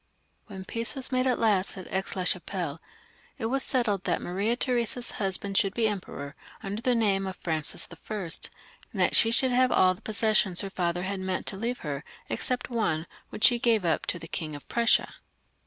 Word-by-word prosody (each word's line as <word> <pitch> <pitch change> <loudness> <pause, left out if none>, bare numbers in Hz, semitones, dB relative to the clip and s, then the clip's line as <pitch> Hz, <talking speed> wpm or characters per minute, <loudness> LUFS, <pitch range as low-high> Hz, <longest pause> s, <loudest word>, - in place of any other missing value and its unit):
When 190 -3 -8
peace 230 +6 -1
was 265 -1 +2
made 255 0 +2
at 250 - +2
last 200 -4 +2
at 185 - -7
Aix 190 0 -2
la 185 - -1
Chapelle, 175 -3 -2 0.6
it 240 - -3
was 270 +4 0
settled 225 -8 +1
that - - +1
Maria 200 +6 -1
Theresa's 245 -1 0
husband 195 0 0
should 195 0 0
be 230 -2 +2
Emperor, 180 -8 -5 0.3
under 200 +3 -4
the 250 0 +2
name 195 -4 +2
of 190 - -5
Francis 160 -4 -1
I., 170 +5 -7 0.8
and - - -7
that - - +3
she 225 - +7
should 255 +3 +2
have 255 +1 +3
all 185 0 +5
the 180 - -16
possessions 215 -4 +2
her 195 -1 -5
father 175 -1 -1
had 195 +1 -2
meant 185 0 -2
to - - -1
leave 235 +5 -3
her, 145 0 -3 0.3
except 250 0 -2
one, 165 -9 0 0.2
which - - -5
she 240 -1 +7
gave 225 -5 +2
up 165 -2 0
to - - -1
the 165 - -9
King 155 -2 -4
of 145 - -11
Prussia. 235 0 +3
200 Hz, 200 wpm, -28 LUFS, 180-235 Hz, 0.8 s, she